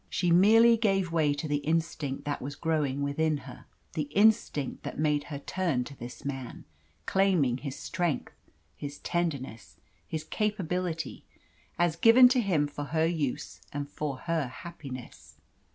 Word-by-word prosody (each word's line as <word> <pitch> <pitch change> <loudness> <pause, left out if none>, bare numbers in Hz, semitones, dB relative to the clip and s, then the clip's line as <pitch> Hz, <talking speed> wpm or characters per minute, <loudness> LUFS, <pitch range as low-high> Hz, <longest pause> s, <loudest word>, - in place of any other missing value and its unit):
She 175 -1 +1
merely 225 +6 +7
gave 195 -5 +1
way 155 -3 +2
to 145 +2 -4
the 145 -1 +1
instinct 160 -2 -2
that 145 -1 -2
was 140 +2 -5
growing 145 -4 0
within 150 +2 +1
her - - -11 0.3
the 150 -2 -2
instinct 205 -9 +3
that - - -6
made 150 -1 +1
her 145 - -5
turn 150 -3 -1
to 140 +2 -10
this 120 +1 -9
man, 135 -3 -5 0.4
claiming 175 -11 +2
his 135 0 -5
strength, 170 -6 -2 0.4
his 145 0 -7
tenderness, 140 -9 -3 0.3
his 155 -1 -4
capability, 180 -4 -2 0.5
as 175 -2 +2
given 230 +8 +8
to 255 -1 +3
him 175 -9 +2
for 145 0 -6
her 160 +2 +1
use 160 -6 -2
and 145 0 -4
for 145 -3 -3
her 165 -5 -1
happiness. 130 -2 -9
155 Hz, 150 wpm, -29 LUFS, 140-175 Hz, 0.5 s, given